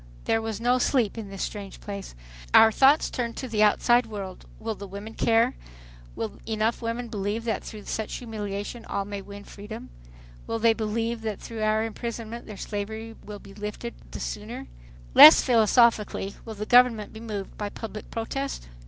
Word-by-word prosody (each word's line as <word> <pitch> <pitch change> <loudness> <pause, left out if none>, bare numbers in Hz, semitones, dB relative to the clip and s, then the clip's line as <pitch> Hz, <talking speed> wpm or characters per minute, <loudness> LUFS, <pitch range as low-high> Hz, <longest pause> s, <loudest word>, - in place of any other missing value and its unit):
There 225 - +2
was 220 -2 -4
no 245 +2 +2
sleep 245 -5 +2
in 220 -3 -6
this 195 -1 -4
strange 200 -2 -6
place. 200 - -7 0.4
Our 225 - +9
thoughts 275 +6 +5
turn 235 -2 -3
to 260 - -5
the 220 -3 0
outside 240 +3 +4
world. 195 -4 -7
Will 225 0 -3
the 200 -1 -9
women 200 +3 -8
care? 225 0 +3 0.6
Will 110 - -5
enough 220 +1 0
women 235 +1 -3
believe 210 +1 -3
that 230 -1 -2
through 215 -2 -9
such 220 -1 -3
humiliation 210 -1 -5
all 200 - -2
may 200 0 -5
win 200 +1 -10
freedom? 210 +3 -9 0.6
Will 230 - -1
they 225 0 +4
believe 225 +1 -2
that 215 -3 -3
through 225 -1 -7
our 215 0 +2
imprisonment 230 +1 -5
their 210 - -8
slavery 220 +3 -5
will 210 0 -8
be 195 - -14
lifted 210 - -6 0.2
the - - -7
sooner? - - -5 0.5
Less 155 - +11
philosophically, 225 -4 +3
will 220 -2 -7
the 210 +1 -4
government 245 -3 +4
be 220 - -9
moved 210 -4 -6
by 205 -1 -4
public 215 0 -8
protest? 230 - -4
220 Hz, 175 wpm, -26 LUFS, 205-230 Hz, 0.6 s, Less